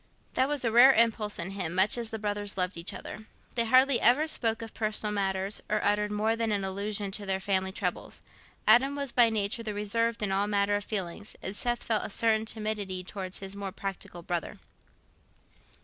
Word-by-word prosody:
That 260 - +2
was 285 -3 -1
a 230 - +1
rare 250 +4 +8
impulse 220 -3 +2
in 175 +3 -4
him, 180 -4 -4
much 190 +3 +4
as 235 -2 -2
the 225 - -4
brothers 205 -1 -3
loved 180 +1 -1
each 170 +1 -3
other. 215 - -8 0.3
They 235 -1 +2
hardly 260 +2 +5
ever 255 +7 +5
spoke 225 -6 +1
of 225 - -9
personal 215 -1 -2
matters, 195 0 -1
or 215 - +1
uttered 210 0 +1
more 215 +2 +1
than 230 -1 -1
an 200 -2 0
allusion 200 +1 -3
to 205 +1 -4
their 190 0 0
family 190 -1 0
troubles. - - -4 0.4
Adam 270 +3 +5
was 280 -3 0
by 240 -2 +5
nature 215 +1 0
reserved 220 +1 -1
in 200 - 0
all 195 +1 +1
matters 205 0 +1
of - - -23
feeling, 200 -1 -3 0.2
and 190 - -3
Seth 240 +2 -1
felt 220 -2 0
a - - -5
certain 220 +1 +1
timidity 210 -4 -3
towards 185 0 -6
his 195 0 -7
more 200 -1 -5
practical 190 -3 -6
brother. 175 -1 -3
210 Hz, 195 wpm, -29 LUFS, 195-230 Hz, 0.4 s, rare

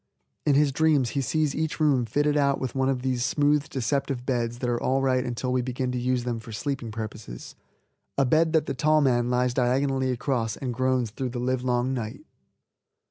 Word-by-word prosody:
In 145 - +4
his 145 0 +4
dreams 145 -3 +2
he 140 - -1
sees 150 +2 0
each 160 0 -2
room 140 -6 +2
fitted 145 +5 +1
out 140 -2 +2
with 130 -3 -3
one 135 0 +1
of 130 -2 -1
those 130 -2 0
smooth, 145 +1 +2
deceptive 135 0 -2
beds 120 -3 -1
that 125 - -3
are 120 -1 0
all 135 +1 +1
right 130 -1 +2
until 125 +1 -2
we 130 - +2
begin 125 0 -2
to 125 - -2
use 125 0 0
them 120 -2 -2
for 115 +1 -11
sleeping 135 +1 -3
purposes, 110 - -7 0.6
a 140 - +4
bed 160 +5 +3
that 160 -2 +3
the - - -2
tall 155 +3 +3
man 120 -3 +2
lies 125 0 +1
diagonally 130 +1 +1
across 120 -3 -1
and 125 -3 -3
groans 130 -2 0
through 130 +3 -3
the 120 0 -5
livelong 125 0 0
night. 110 -4 -5
130 Hz, 200 wpm, -26 LUFS, 120-140 Hz, 0.6 s, In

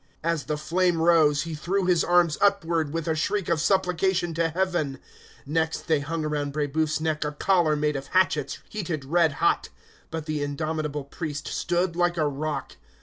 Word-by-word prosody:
As 165 -3 0
the 150 - -2
flame 175 +3 +1
rose, 160 -3 +4
he 165 -1 -6
threw 185 +5 -1
his 180 -2 +3
arms 175 -3 +3
upward, 170 -7 +2
with 165 0 -3
a 160 - +2
shriek 175 +4 -1
of 155 - +1
supplication 180 -1 +1
to 165 0 +1
Heaven. 170 -5 -1 0.5
Next 160 +2 -1
they 155 -2 +2
hung 155 +2 -3
around 145 -2 -2
Brébeuf's 155 +1 0
neck 155 -1 -1
a 150 - -2
collar 170 -1 +2
made 150 0 0
of 135 0 -5
hatchets 155 -6 +1
heated 170 -9 -4
red 165 +1 +3
hot; - - +1 0.4
but 160 -1 -5
the 155 -2 -2
indomitable 150 0 -2
priest 145 0 -5
stood 175 0 0
like 175 0 +1
a 155 -2 +2
rock. 145 0 -4
160 Hz, 175 wpm, -26 LUFS, 150-175 Hz, 0.5 s, rose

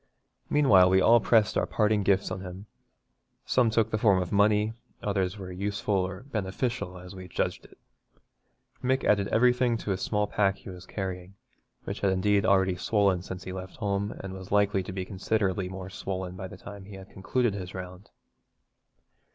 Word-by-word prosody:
Meanwhile 100 -12 +6
we 95 +1 +5
all 115 +5 +6
pressed 110 -1 +3
our - - -1
parting 105 -1 +2
gifts 100 0 +1
on 95 - -4
him; 95 +1 -8 0.8
some 125 -3 +3
took 110 0 +1
the 110 - 0
form 100 -4 +4
of 90 -1 -3
money, 105 +1 +3 0.3
others 100 -1 -1
were 95 -2 -7
useful 100 +3 -2
or 95 +1 -1
beneficial, 110 -4 -3
as 90 +1 -10
we 95 -1 -9
judged - - -2
it. - - -18 1.1
Mick 130 +1 +1
added 100 -1 +3
everything 125 +1 +3
to 105 - -4
the 95 - 0
small 105 +2 0
pack 100 -1 +1
he 95 - -10
was 90 0 -11
carrying, 95 -1 -5 0.5
which - - -5
had 100 - +2
indeed 100 +2 +2
already 95 -2 +3
swollen 100 -2 +2
since 90 0 -7
he 95 - -6
left 95 0 -7
home, 100 -2 -1
and 95 -1 -6
was 95 0 -9
likely 100 -1 +3
to 90 - -7
be 95 0 -4
considerably 95 -1 -1
more 95 0 -7
swollen 95 -1 -4
by 95 0 -6
the - - -11
time 100 -1 -10
he 100 0 -10
had 95 0 -12
concluded 115 +4 0
his 95 -2 -6
round. 90 +1 -8
100 Hz, 185 wpm, -28 LUFS, 95-105 Hz, 1.1 s, Meanwhile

